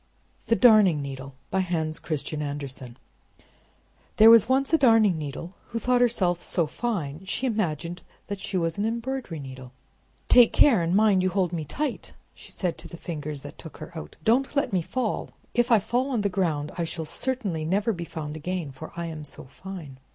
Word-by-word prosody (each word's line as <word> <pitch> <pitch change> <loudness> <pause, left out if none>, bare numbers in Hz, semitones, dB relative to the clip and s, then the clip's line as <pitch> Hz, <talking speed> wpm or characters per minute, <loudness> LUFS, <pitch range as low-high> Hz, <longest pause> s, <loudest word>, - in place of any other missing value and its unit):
THE 230 - +4
DARNING 215 -10 +6
NEEDLE 135 -1 -7 0.2
By 190 - +1
Hans 160 -4 -1
Christian 155 -1 -3
Andersen 140 -4 -6 1.2
There 220 +1 +9
was 230 0 +7
once 270 +3 +2
a - - +7
darning 225 -7 +5
needle, 155 +4 -6
who 230 - -4
thought 245 +2 +2
herself 185 -8 +2
so 170 -1 0
fine, 170 -5 -3
she 240 +7 -1
imagined 175 - -2 0.4
she 190 0 -3
was 165 +1 -1
an 205 - +1
embroidery 235 - -3
needle. 130 -2 -9 0.5
"Take 245 -2 +7
care, 245 -11 +5
and 170 +2 +1
mind 205 -3 +4
you 185 - +2
hold 185 -2 0
me 160 -3 -3
tight!" 270 - -4 0.2
she - - -14
said 180 -3 -3
to - - -8
the 170 - -10
Fingers 150 -4 -5
that - - -10
took - - -10
her - - -10
out. 75 - -8
"Don't 260 - +2
let 280 -7 +1
me 185 - +2
fall! 235 +6 -2 0.2
If 240 +1 +2
I 230 - +8
fall 240 +6 0
on 245 -5 0
the 200 - +1
ground 160 -6 -1
I - - +1
shall 165 0 -4
certainly 205 -6 -3
never 200 +7 +1
be 170 -3 -5
found 155 -2 -6
again, 165 -1 -4
for 135 +4 -10
I 170 0 -3
am 160 -2 -6
so 145 - -11
fine!" 150 -1 -10
180 Hz, 190 wpm, -26 LUFS, 155-225 Hz, 1.2 s, There